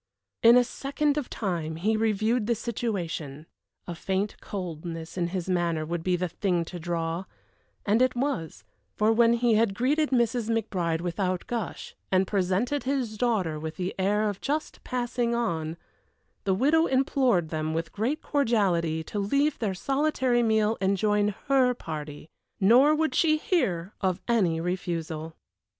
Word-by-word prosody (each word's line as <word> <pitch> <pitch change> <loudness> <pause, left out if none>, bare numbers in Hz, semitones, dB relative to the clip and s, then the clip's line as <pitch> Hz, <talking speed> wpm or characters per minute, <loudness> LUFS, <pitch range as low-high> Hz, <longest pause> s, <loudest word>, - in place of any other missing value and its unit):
In 235 +1 +8
a 250 - +6
second 280 +3 -1
of 295 -4 -3
time 170 -6 -3
he 210 +7 +1
reviewed 220 +1 +1
the 235 - +2
situation; 175 - -4 0.4
a 175 - -5
faint 190 +4 -2
coldness 165 -3 -6
in 175 -2 0
his 180 0 -4
manner 170 -4 0
would 170 +1 -3
be 180 +2 +1
the 180 +1 -1
thing 175 -1 -1
to 175 +1 -7
draw 165 +1 -2 0.6
and 215 +4 +3
it 255 0 +3
was; 245 - -2 0.3
for 215 +1 +3
when 230 +1 +5
he 235 -1 +2
had 215 -2 +2
greeted 290 +7 +1
Mrs. 235 -2 +1
McBride 180 -8 -1
without 180 +1 -2
gush, 230 -6 -4 0.2
and 190 0 +3
presented 200 +9 0
his 260 -5 -2
daughter 205 -10 0
with 160 +1 -5
the 185 0 -3
air 210 +3 +2
of 200 -2 -4
just 300 +3 -3
passing 240 -1 -1
on, 165 -8 -2 0.7
the 190 -1 +2
widow 310 - +3
implored 260 - +2
them 155 0 -2
with 165 0 -3
great 245 +9 -2
cordiality 190 - +1
to 205 - -4
leave 280 +9 +1
their 205 -5 -1
solitary 270 0 +1
meal 220 -1 +2
and 195 +1 +2
join 210 +1 +2 0.2
her 260 -3 +3
party. 150 -6 -7 0.3
Nor 250 +10 +6
would 315 +1 0
she 310 -2 +3
hear 195 - -1
of 185 -1 0
any 190 -9 +2
refusal. 165 -2 -3
205 Hz, 155 wpm, -27 LUFS, 170-240 Hz, 0.7 s, In